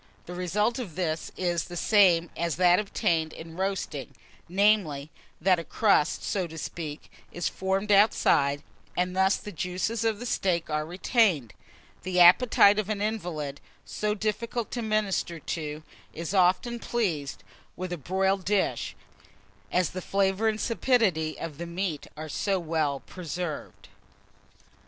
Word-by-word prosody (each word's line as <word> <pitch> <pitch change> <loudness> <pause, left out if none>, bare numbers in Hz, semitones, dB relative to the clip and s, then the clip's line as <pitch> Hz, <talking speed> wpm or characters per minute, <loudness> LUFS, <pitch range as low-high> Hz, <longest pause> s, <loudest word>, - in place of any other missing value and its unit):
The 175 - -8
result 210 +7 0
of 195 -11 -6
this 160 -3 -2
is 175 -3 0
the 175 - -7
same 175 -5 +4
as 170 -1 -1
that 180 0 +5
obtained 165 -6 0
in 165 0 -10
roasting; 190 -7 -3 0.3
namely, 180 -7 +2 0.3
that 185 +1 +3
a - - -4
crust, 200 -5 +2
so 185 -3 -1
to 160 0 -10
speak, 155 -1 -6 0.2
is 175 - -2
formed 195 +2 -1
outside, 145 -8 +4 0.3
and 180 0 0
thus 190 +1 +3
the 210 - -8
juices 185 +5 -2
of 225 -2 +1
the 245 0 -2
meat 170 -3 +1
are 150 0 -1
retained. 180 - +1 0.5
The 180 -1 -1
appetite 200 +3 +7
of 210 -1 -2
an 215 -2 -1
invalid, 175 -10 -3 0.2
so 210 0 -2
difficult 220 +2 -2
to 240 - -3
minister 215 -6 0
to, 155 -1 -5 0.3
is 165 +3 -4
often 190 +6 +2
pleased 175 -14 -2 0.3
with 185 0 -4
a - - -3
broiled 190 +5 0
dish, 200 0 0 0.8
as 180 -1 +1
the 185 - -5
flavour 195 +3 +1
and 215 -1 0
sapidity 200 -9 +1
of 160 -3 -6
the 170 - -4
meat 170 -3 -3
are 155 +1 -6
so 195 +5 0
well 155 -4 -1
preserved. 175 -2 -6
180 Hz, 145 wpm, -27 LUFS, 165-205 Hz, 0.8 s, appetite